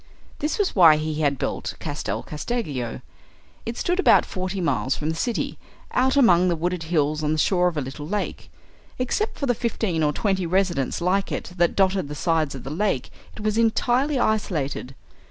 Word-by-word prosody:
This 300 +1 -1
was 410 -3 0
why 165 -5 +8
he 155 0 -2
had 140 -2 +2
built - - -3
Castel 130 -8 -4
Casteggio. 150 - -4 0.7
It 230 - -4
stood 355 +2 0
about - - +5
forty 185 +1 -4
miles 165 -6 0
from 155 - -3
the - - -4
city, 235 +7 -2 0.3
out 265 +2 +2
among 185 -9 +5
the 175 - +2
wooded 175 +2 -2
hills 155 -2 +1
on 150 +1 +1
the - - -1
shore 180 +3 +3
of 170 -3 -2
a - - +1
little 140 +3 -6
lake. 205 +4 -3 0.5
Except 340 - -1
for 280 - -2
the 245 - +2
fifteen 220 -7 -1
or 150 -1 +3
twenty 190 +1 0
residences 175 -6 0
like 190 +3 +1
it - - -4
that 175 0 +2
dotted 190 -4 +2
the 150 - -6
sides 155 -1 0
of 135 - -8
the 135 - -6
lake 170 -6 -1 0.2
it - - -9
was 215 +1 +1
entirely 245 +5 +2
isolated. 155 - -1
180 Hz, 190 wpm, -24 LUFS, 150-215 Hz, 0.7 s, why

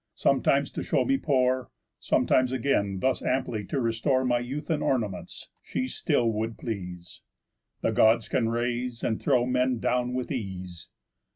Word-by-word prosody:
Sometimes - - +2
to - - -4
show - - +1
me 270 0 +2
poor, 130 - +1 0.3
Sometimes 130 -1 +2
again 100 -7 0
thus 130 0 +1
amply 120 -5 -1
to 135 - -2
restore 130 +3 +1
My 120 -1 +2
youth 135 +7 -4
and 150 -2 0
ornaments, 105 -9 -2
she 130 - -3
still 120 -2 +1
would 110 +1 -3
please. 90 -6 -6 0.6
_The - - +1
Gods 110 +1 +4
can 115 -3 +1
raise, 120 0 -2
and 110 - -1
throw 125 -4 +3
men 125 0 +1
down, 125 +1 0
with 125 -1 -3
ease." 95 -7 -5
120 Hz, 155 wpm, -27 LUFS, 110-130 Hz, 0.6 s, Gods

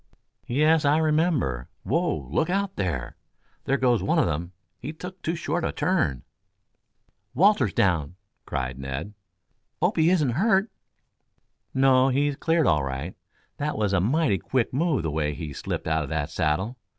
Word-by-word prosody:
"Yes, 155 +5 +3
I 145 +1 +4
remember. 155 - +1
Whoa! 165 - -1
Look 160 +2 +1
out, 195 +1 -1
there! 80 -11 -3 0.5
There 140 - +2
goes 125 -5 +2
one 95 - +1
of - - +4
them! 85 +2 -3 0.3
He 140 +9 -6
took 180 +3 -9
too 165 - -1
short 165 +1 -2
a - - 0
turn." 80 - 0 1.1
"Walter's 190 - +4
down!" 85 -4 +1 0.3
cried 65 -1 -3
Ned. 70 +9 -5 0.7
"Hope 175 +5 +1
he 160 +1 +4
isn't 155 -8 +2
hurt." 195 - +2 1.0
"No; 130 0 +5
he's 140 +2 +1
cleared 165 +1 +1
all 75 - +3
right. 70 +6 -4 0.4
That 150 +1 -2
was 105 -2 0
a 95 - +3
mighty 125 - +2
quick 125 +8 -1
move 150 - +1
the 80 - -1
way 75 -1 -1
he 75 -1 -6
slipped - - -4
out 80 0 +1
of 70 - -5
that 75 -2 -2
saddle. 95 +11 -1
130 Hz, 160 wpm, -25 LUFS, -, 1.1 s, No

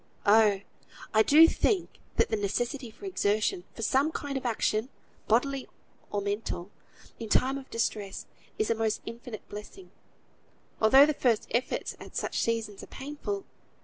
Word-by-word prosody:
Oh! 205 -2 +5 0.5
I 220 - +6
do 305 +8 +8
think 380 +2 0 0.2
that - - +3
the 220 - +1
necessity 235 +5 -2
for 235 - -12
exertion, 210 - 0
for 225 - -5
some 275 +7 +2
kind 285 -3 -4
of 260 -2 -2
action 220 +1 0 0.4
(bodily 265 +4 +1 0.4
or 205 - -1
mental) 200 -2 -3 0.5
in 225 - -6
time 260 +5 +3
of 270 -1 -8
distress, 210 -4 -2 0.3
is 215 - +1
a - - +5
most 225 -1 -1
infinite 230 -1 -8
blessing, 210 - -10 0.9
although 265 +6 +8
the 305 - +1
first 240 -6 +1
efforts 245 +3 -1
at - - -11
such - - -1
seasons 225 -3 -1
are - - -10
painful. 295 +9 -5
230 Hz, 150 wpm, -29 LUFS, 215-275 Hz, 0.9 s, do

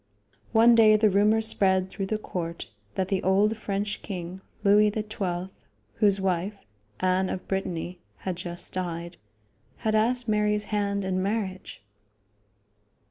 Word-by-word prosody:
One 230 +1 +6
day 220 -2 +7
the 215 -1 +4
rumor 210 +3 +4
spread 190 -4 +3
through 195 0 -5
the 215 - -1
court 170 - -5 0.2
that 190 -1 -1
the 195 -2 0
old 200 +4 +3
French 205 -1 -3
king, 180 -1 -6 0.2
Louis 210 +1 +5
XII, 195 -4 -3 0.5
whose 200 -2 +3
wife, 190 +2 -2 0.4
Anne 185 0 +2
of 185 - -5
Brittany, 180 -2 -3 0.2
had 185 -2 -4
just 175 0 -5
died, 170 -1 -4 0.6
had 220 - -1
asked 240 +3 +2
Mary's 210 -1 +1
hand 200 -1 0
in 185 0 0
marriage. 195 - -3
195 Hz, 135 wpm, -26 LUFS, 185-210 Hz, 0.6 s, day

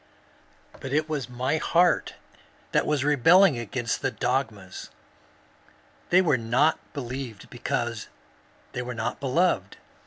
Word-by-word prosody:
But 135 - -6
it 155 +1 +1
was 145 -6 -3
my 125 +5 -1
heart 170 +2 +2 0.6
that - - +1
was 150 -3 +1
rebelling 150 +2 +5
against 120 0 -3
the - - +1
dogmas. 110 -8 -3 1.2
They 185 +2 +5
were 150 -8 +2
not 125 +8 +2
believed 125 -5 -6
because - - -3 0.6
they - - -4
were 125 0 -5
not 110 0 -3
beloved. 150 +7 0
135 Hz, 120 wpm, -26 LUFS, 120-155 Hz, 1.2 s, rebelling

